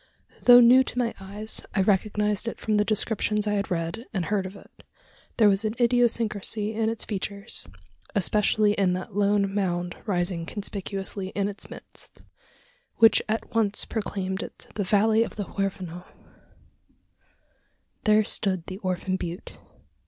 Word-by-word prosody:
Though 245 0 +9
new 250 +2 +7
to - - -6
my 240 -2 0
eyes, 205 +3 -5
I 195 - +3
recognised 210 +2 +1
it - - -4
from 215 -1 0
the 210 - +4
descriptions 210 0 0
I 210 - 0
had 200 -1 -1
read 175 +7 -3
and 180 -3 0
heard 195 -1 -1
of 190 - -11
it. - - -17 0.5
There 220 - +6
was 195 +1 +3
an 215 +1 -2
idiosyncrasy 230 -3 +1
in 220 0 0
its 225 -1 -3
features 200 - -4 0.5
especially 210 +1 +2
in 195 -3 +2
that 185 +3 -5
lone 200 -1 +2
mound 175 -3 -1
rising 175 -3 0
conspicuously 195 -1 -4
in 200 -1 +1
its 200 -1 -6
midst - - -13 0.7
which 225 -1 +6
at 220 +1 -2
once 210 -3 +2
proclaimed 195 -3 -3
it - - -10
the 205 - -2
valley 215 +3 +3
of 230 - -2
the 205 - -3
Huerfano. 185 -3 -4 2.0
There 215 0 +5
stood 190 -4 -1
the 190 +1 -7
"Orphan 185 -1 -2
Butte." 175 0 -7
205 Hz, 150 wpm, -26 LUFS, 190-215 Hz, 2.0 s, Though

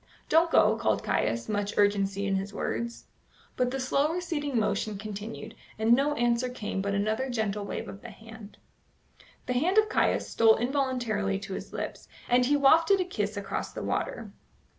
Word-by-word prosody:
"Don't 330 +2 +4
go," 215 -7 +4
called 230 - 0
Caius, 115 +1 0
much 205 -1 -2
urgency 200 -1 +2
in 195 - 0
his 195 +1 -2
words. 235 +3 -4 0.5
But 250 -1 +1
the 270 +1 -3
slow 275 +4 +1
receding 315 -6 -2
motion 215 -1 -1
continued, 210 +2 -7 0.2
and 220 +2 +4
no 285 +4 +2
answer 240 0 +1
came 210 -5 -4
but 200 0 -1
another 215 +6 0
gentle 215 -4 -2
wave - - -5
of 195 - -9
the 240 - -9
hand. 220 0 -13 0.9
The 250 - -1
hand 335 +11 +1
of 430 0 +5
Caius - - +1
stole 225 -1 +5
involuntarily 240 -6 -1
to 195 -1 -6
his - - -7
lips, - - -6 0.2
and 245 0 +3
he 290 +1 +3
wafted 325 +8 +5
a 365 - +1
kiss 210 - -3
across 200 -1 -4
the - - -5
water. - - -3
225 Hz, 175 wpm, -28 LUFS, 205-265 Hz, 0.9 s, of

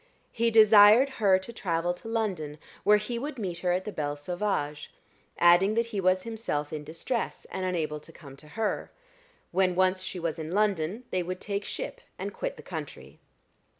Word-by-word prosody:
He 235 0 +1
desired 220 +3 +7
her 195 -3 +6
to 190 +5 -8
travel 175 -4 -1
to 180 - -11
London 190 -10 -2 0.3
where 210 0 +6
he 235 +3 -3
would 285 +2 -5
meet 180 -6 -3
her 180 0 0
at 185 +1 0
the 210 - -4
Belle 145 -5 -2
Sauvage, 150 -2 -3 0.5
adding 175 +5 +5
that 230 +1 +2
he 200 - 0
was 185 0 +2
himself 215 -11 -3
in 150 -1 -4
distress, 165 - -3
and 190 - -3
unable 155 -4 -2
to 160 - -14
come 140 -5 -13
to 150 - -16
her: 220 -1 -1 0.6
when 185 0 +2
once 185 0 +2
she 185 0 -5
was 165 -1 -3
in 160 +2 -5
London 200 +1 0
they 185 - +1
would 180 +1 -4
take 200 0 -3
ship - - -5 0.2
and - - -5
quit - - -4
the - - -11
country. - - -8
185 Hz, 185 wpm, -28 LUFS, 165-215 Hz, 0.6 s, desired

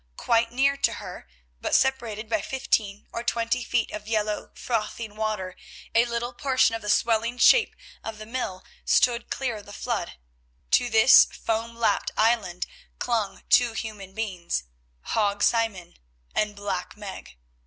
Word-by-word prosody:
Quite 230 0 +2
near 275 +3 +2
to - - +2
her, - - -8 0.3
but - - +1
separated 235 -5 +1
by 220 -2 0
fifteen 210 -5 -1
or 235 - -3
twenty 235 +1 0
feet 240 -2 0
of 210 0 -7
yellow 215 -1 -1
frothing 220 -2 -3
water, 215 -4 -2 0.4
a 230 +1 +5
little 240 +1 -3
portion 260 -2 +2
of 225 - -3
the 210 - -5
swelling 230 +2 +2
shape 465 - +5 0.3
of 225 -1 -6
the 215 - -8
mill 215 -6 -4 0.2
stood 240 -1 +2
clear 250 -5 -2
of 205 - -12
the 205 - -10
flood. - - -3 0.6
To 245 - +4
this 225 +3 +8
foam 225 +1 -3
lapped 225 -3 +1
island 215 -6 +2 0.3
clung 225 -5 -2
two 245 -2 +4
human 205 -4 -6
beings—Hague 170 - -3
Simon 225 -7 +1 0.4
and 210 -1 0
Black 200 -1 -4
Meg. 195 - -9
220 Hz, 145 wpm, -26 LUFS, 205-235 Hz, 0.6 s, this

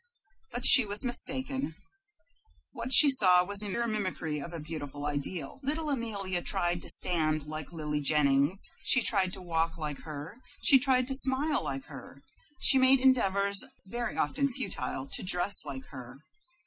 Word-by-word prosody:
But 245 - -2
she 255 -3 +10
was 205 +4 -2
mistaken. 260 - -1 1.0
What 245 -1 -7
she 295 - +9
saw 185 -10 +5
was 200 +1 +3
pure 210 +3 -2
mimicry 185 -8 -5
of 145 +4 -9
a 170 - -8
beautiful 145 -2 -9
ideal. 150 - -6
Little 300 +2 -4
Amelia 200 -8 -5
tried 175 0 -3
to - - -3
stand 155 -4 +2
like 155 0 -9
Lily 150 -3 -5
Jennings; 145 +3 +1 0.2
she 260 - +2
tried 190 -4 -1
to 185 - -9
walk 165 -1 -3
like 150 -3 -7
her; 155 - -10 0.2
she 270 - +5
tried 255 -1 0
to - - -2
smile 270 +3 +2
like 135 -1 -7
her; 140 -1 -14 0.4
she 265 - +4
made 260 +1 +3
endeavors, 200 -6 +1 0.2
very 240 +5 -6
often 280 0 -2
futile, 185 - -6
to - - -2
dress 185 +1 +1
like 135 -1 -9
her. 130 -2 -12
185 Hz, 160 wpm, -27 LUFS, 155-255 Hz, 1.0 s, she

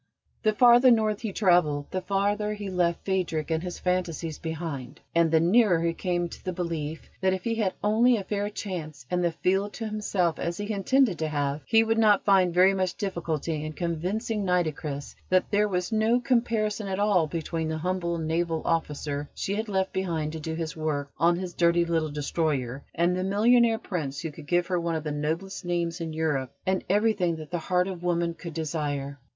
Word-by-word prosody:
The 215 - +2
farther 245 +3 +7
north 215 -3 +2
he 220 -3 -3
travelled, 175 -8 +2
the 185 - -2
farther 205 +2 0
he 205 -2 -5
left 175 -2 0
Phadrig 170 -5 -1
and 160 0 +1
his 180 0 -5
phantasies 175 -3 -2
behind, 160 -6 -5
and 170 -1 +4
the 160 0 +4
nearer 180 +1 +4
he 170 0 +1
came 175 0 -1
to - - -11
the 185 - -2
belief 165 -3 -4
that, 190 0 +3
if 185 - -7
he 230 - 0
had 215 -5 0
only 230 +4 +4
a 200 - -4
fair 205 +1 -2
chance 160 - -6
and 180 0 +1
the 170 - +2
field 190 +5 0
to 225 - -5
himself, 205 -5 -1
as 170 +1 -2
he 205 +1 -3
intended 210 0 +2
to 160 - 0
have, 145 -1 -1
he 225 0 +5
would 225 0 +1
not 210 -2 +4
find 190 -3 +4
very 185 +3 +5
much 185 -2 -1
difficulty 165 -5 -2
in 155 0 -5
convincing 190 +7 -2
Nitocris 155 -6 -1 0.2
that 185 +1 +2
there 210 0 +3
was 180 0 -2
no 220 +2 +3
comparison 230 -4 0
at 190 -1 -2
all 200 -5 +3
between 165 0 -3
the 160 0 -2
humble 170 0 -1
naval 165 0 -1
officer 150 -3 -2
she 195 - -2
had 215 +2 -2
left 190 -1 0
behind 165 -5 -1
to 160 - -6
do 160 +1 -4
his 160 -2 -4
work 150 -3 -2
on 170 +2 +4
his 180 -1 -5
dirty 170 0 +3
little 165 -2 0
destroyer, 145 -3 -2
and 175 +2 +2
the 185 - -1
millionaire 225 +4 +4
Prince 155 - -4
who 160 - -4
could 145 0 -12
give 175 +2 +2
her 180 -1 0
one 170 -1 -1
of 160 - -3
the 150 - -3
noblest 160 +6 -3
names 170 -1 -2
in 165 -1 -3
Europe 150 -5 -1
and 190 0 0
everything 205 -4 +2
that 155 -2 -9
the 175 - -1
heart 180 +2 +1
of 185 -3 -5
woman 170 -1 0
could 165 -1 -9
desire. 145 -3 -3
175 Hz, 200 wpm, -27 LUFS, 160-200 Hz, 0.2 s, farther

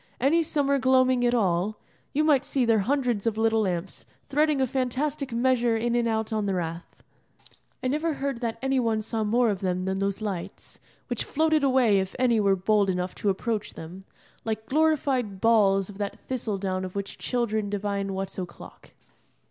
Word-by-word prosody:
Any 290 +7 +3
summer 280 -3 +1
gloaming 255 -1 +3
at 240 - +2
all, 195 -1 +1 0.3
you 300 - +1
might 290 -4 +4
see 265 -3 0
their 225 -2 +3
hundreds 240 -1 0
of 220 -1 0
little 225 0 +2
lamps 185 -2 -3 0.2
threading 300 0 +2
a 265 - +3
fantastic 265 +2 -2
measure 240 -1 +2
in 235 +1 -1
and 240 -1 +2
out 220 -1 -1
on 215 -2 0
the 195 - 0
rath. 170 0 -5 0.8
I - - +1
never 305 +4 0
heard 275 -4 -3
that 230 -2 -2
any 270 0 +2
one 225 -3 +1
saw 220 0 -2
more 230 +2 +2
of 195 - -3
them 185 -1 -1
than 190 0 -1
those 195 0 -1
lights, 195 -3 -6 0.3
which - - -2
floated 315 0 +1
away 255 -7 +4
if 190 0 -4
any 245 -3 +3
were 200 -2 +3
bold 200 +1 +2
enough 180 0 -1
to 205 - -1
approach 210 +2 -2
them, 180 +4 -9 0.4
like 220 -1 -3
glorified 265 -7 +1
balls 195 -4 +4
of 205 -1 -11
that 200 -1 -3
thistledown 195 -7 -3
of 185 0 -6
which 200 0 -5
children 220 -4 -1
divine 200 -1 -2
what's 195 0 -4
o'clock. 180 -2 -10
225 Hz, 180 wpm, -26 LUFS, 195-260 Hz, 0.8 s, might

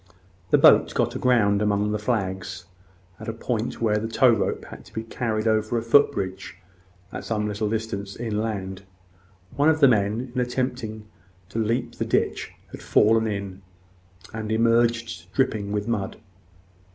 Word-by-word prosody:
The - - +5
boat - - +6
got - - +1
aground 105 -5 +2
amongst 105 0 +1
the 105 - -1
flags, 95 -5 -2 0.5
at - - -9
a 115 - -2
point 115 0 -3
where 105 -1 +2
the 110 - -3
tow 120 +2 +4
rope 115 - -1
had - - -11
to - - -18
be 110 - -3
carried 115 -1 -2
over 110 +1 +1
a 115 - -2
foot 140 +5 +5
bridge 95 -2 -5 0.6
at - - -6
some 105 -2 -1
little 105 0 -2
distance 105 -3 -4
inland. 105 -4 -3 0.7
One 145 +4 +4
of 160 0 +2
the 140 - +7
men, 110 +2 +1
in 125 - 0
attempting 125 -3 -3 0.4
to 115 - -4
leap 115 +2 -1
the - - 0
ditch, - - 0 0.2
had - - -9
fallen 110 +1 +3
in, 100 -2 -5 0.7
and 110 -1 -4
emerged 115 -6 +1
dripping 110 -7 0
with 105 +1 -2
mud. 105 -5 -2
110 Hz, 160 wpm, -24 LUFS, 100-115 Hz, 0.7 s, the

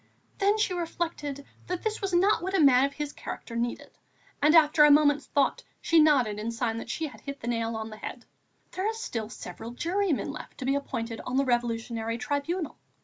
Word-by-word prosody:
Then 405 +1 +3
she 425 -4 +1
reflected 325 -5 -3 0.2
that 360 -1 -3
this 440 0 -2
was 390 -1 -1
not 380 +4 +3
what 380 +2 -2
a - - +3
man 270 -3 +6
of 280 - -3
his 295 -1 -4
character 230 - -7
needed; 235 +1 -4 0.4
and, 300 +3 +5
after 305 -1 +6
a 295 - +8
moment's 290 0 +4
thought, 280 - +1 0.2
she 330 - +3
nodded 260 -9 +4
in 220 +2 -3
sign 230 -1 -2
that 230 - -8
she 320 - -2
had 285 - -9
hit 280 0 -7
the 230 - -7
nail 230 -1 -1
on 220 0 -5
the 215 - -9
head: 245 +2 -7 0.5
"There 375 +2 -2
are - - -2
still 230 - -4
several 220 +1 -8
jurymen 335 +3 -1
left 305 - -9
to 260 - -5
be 270 - +2
appointed 230 -5 -3
on 250 +1 -3
the 275 - +3
Revolutionary 230 -2 -1
Tribunal. 290 +5 -3
280 Hz, 205 wpm, -28 LUFS, 235-330 Hz, 0.5 s, a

